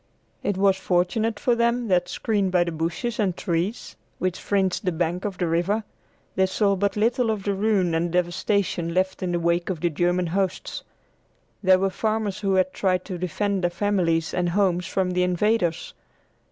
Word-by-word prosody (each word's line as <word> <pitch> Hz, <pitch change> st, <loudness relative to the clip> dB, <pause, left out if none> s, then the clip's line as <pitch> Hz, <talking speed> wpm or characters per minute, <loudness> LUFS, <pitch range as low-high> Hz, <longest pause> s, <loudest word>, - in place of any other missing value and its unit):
It 200 Hz, -2 st, -1 dB
was 195 Hz, -1 st, +3 dB
fortunate 195 Hz, +5 st, 0 dB
for 245 Hz, -, +2 dB
them 235 Hz, 0 st, +1 dB
that, 180 Hz, -1 st, +2 dB
screened 200 Hz, -4 st, 0 dB
by 180 Hz, -1 st, +4 dB
the 170 Hz, -, -3 dB
bushes 165 Hz, +10 st, -3 dB
and 190 Hz, -5 st, 0 dB
trees 175 Hz, +6 st, -2 dB, 0.2 s
which 185 Hz, -1 st, -2 dB
fringed 195 Hz, -1 st, 0 dB
the 185 Hz, -, +1 dB
bank 175 Hz, +3 st, -2 dB
of 200 Hz, -3 st, -3 dB
the 180 Hz, -, 0 dB
river, 175 Hz, +6 st, 0 dB, 0.5 s
they 190 Hz, 0 st, +2 dB
saw 200 Hz, +1 st, +1 dB
but 200 Hz, +1 st, 0 dB
little 230 Hz, +3 st, +1 dB
of 215 Hz, -3 st, -1 dB
the 200 Hz, -, 0 dB
ruin 195 Hz, -4 st, +1 dB
and 165 Hz, +1 st, 0 dB
devastation 180 Hz, -1 st, 0 dB
left 190 Hz, +1 st, 0 dB
in 185 Hz, -1 st, -1 dB
the 175 Hz, -, 0 dB
wake 170 Hz, +1 st, 0 dB
of 180 Hz, -4 st, -2 dB
the 175 Hz, -1 st, +1 dB
German 175 Hz, +3 st, +1 dB
hosts. 185 Hz, +2 st, -2 dB, 0.8 s
There 185 Hz, -2 st, +5 dB
were 195 Hz, +1 st, 0 dB
farmers 215 Hz, -1 st, -1 dB
who 195 Hz, -2 st, +1 dB
had 185 Hz, 0 st, +2 dB
tried 185 Hz, -2 st, 0 dB
to 185 Hz, -3 st, -5 dB
defend 195 Hz, +3 st, -1 dB
their 175 Hz, -, +3 dB
families 175 Hz, -3 st, 0 dB
and 180 Hz, -1 st, 0 dB
homes 180 Hz, -2 st, +1 dB
from 185 Hz, -1 st, 0 dB
the 180 Hz, 0 st, +1 dB
invaders. 180 Hz, -1 st, 0 dB
185 Hz, 185 wpm, -24 LUFS, 175-205 Hz, 0.8 s, There